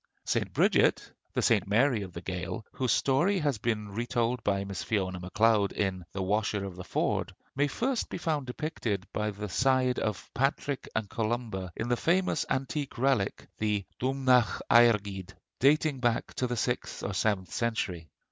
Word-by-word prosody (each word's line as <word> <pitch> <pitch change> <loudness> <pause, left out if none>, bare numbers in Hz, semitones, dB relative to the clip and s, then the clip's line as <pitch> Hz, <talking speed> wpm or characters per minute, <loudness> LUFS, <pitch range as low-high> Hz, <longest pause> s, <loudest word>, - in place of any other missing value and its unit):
St. - - 0
Bridget, - - +3 0.2
the - - 0
St. - - +3
Mary 120 +2 +3
of 95 -2 -6
the 85 - -6
Gael, 90 +2 -4
whose 130 -2 -1
story 170 +9 +3
has 145 - 0
been 105 -2 -1
retold 120 +1 -1
by 100 -2 +1
Miss 100 -2 -5
Fiona 95 -4 -1
Macleod 105 +3 +2
in 95 -3 -1
'The 95 - -3
Washer 105 +1 0
of 95 -2 -7
the 90 - -7
Ford,' - - -1 0.2
may 145 +2 +2
first 240 - -1
be - - -4
found 155 -6 -1
depicted 125 - -3
by 105 0 0
the 105 0 -5
side 130 +3 +2
of 105 -3 -3
Patrick 135 +1 -1
and 110 -2 0
Columba 110 -4 -2
in 110 - -3
the 120 0 +1
famous 175 +1 +1
antique 135 +1 -2
relic, 125 -6 +1
the 105 -2 0
'Domhnach 130 -4 +2
Airgid,' 100 -5 +4 0.2
dating 145 +1 +3
back 120 -2 0
to 125 - -1
the 120 0 -3
sixth 120 +3 -2
or 100 - -2
seventh 95 -2 0
century. 95 -8 -2
115 Hz, 165 wpm, -29 LUFS, 100-130 Hz, 0.2 s, Airgid